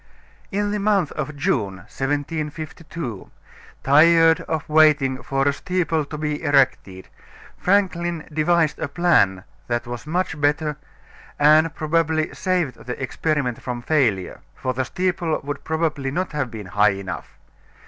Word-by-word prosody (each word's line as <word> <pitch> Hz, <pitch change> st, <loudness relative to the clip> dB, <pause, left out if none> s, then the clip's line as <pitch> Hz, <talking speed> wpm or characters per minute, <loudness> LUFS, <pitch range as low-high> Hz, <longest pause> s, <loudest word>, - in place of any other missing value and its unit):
In 205 Hz, +1 st, 0 dB
the 210 Hz, -, -1 dB
month 200 Hz, -6 st, +1 dB
of 150 Hz, -1 st, -4 dB
June, 110 Hz, -9 st, 0 dB
1752, 150 Hz, -, -4 dB, 0.5 s
tired 165 Hz, +3 st, +5 dB
of 160 Hz, -2 st, -2 dB
waiting 150 Hz, -4 st, +4 dB
for 135 Hz, 0 st, 0 dB
a 140 Hz, -, +3 dB
steeple 165 Hz, -1 st, -1 dB
to 150 Hz, -, -7 dB
be 150 Hz, -1 st, -2 dB
erected, 135 Hz, -, +1 dB, 0.5 s
Franklin 175 Hz, -4 st, 0 dB
devised 160 Hz, 0 st, +2 dB
a 160 Hz, -, -2 dB
plan 145 Hz, -, +2 dB, 0.2 s
that 120 Hz, 0 st, -1 dB
was 120 Hz, +3 st, -7 dB
much 160 Hz, -2 st, -2 dB
better 150 Hz, +1 st, +1 dB, 0.6 s
and 155 Hz, +2 st, +5 dB
probably 160 Hz, 0 st, 0 dB
saved 175 Hz, -10 st, -1 dB
the 125 Hz, -, -4 dB
experiment 135 Hz, -2 st, -1 dB
from 120 Hz, -1 st, -5 dB
failure; 120 Hz, -, +1 dB, 0.2 s
for 130 Hz, -, -2 dB
the 130 Hz, +1 st, -1 dB
steeple 175 Hz, -2 st, -1 dB
would 145 Hz, 0 st, -5 dB
probably 160 Hz, -4 st, -1 dB
not 180 Hz, +7 st, -2 dB
have 145 Hz, -5 st, -2 dB
been 110 Hz, -3 st, -8 dB
high 105 Hz, +3 st, +3 dB
enough. 95 Hz, -1 st, -7 dB
150 Hz, 135 wpm, -22 LUFS, 130-165 Hz, 0.6 s, tired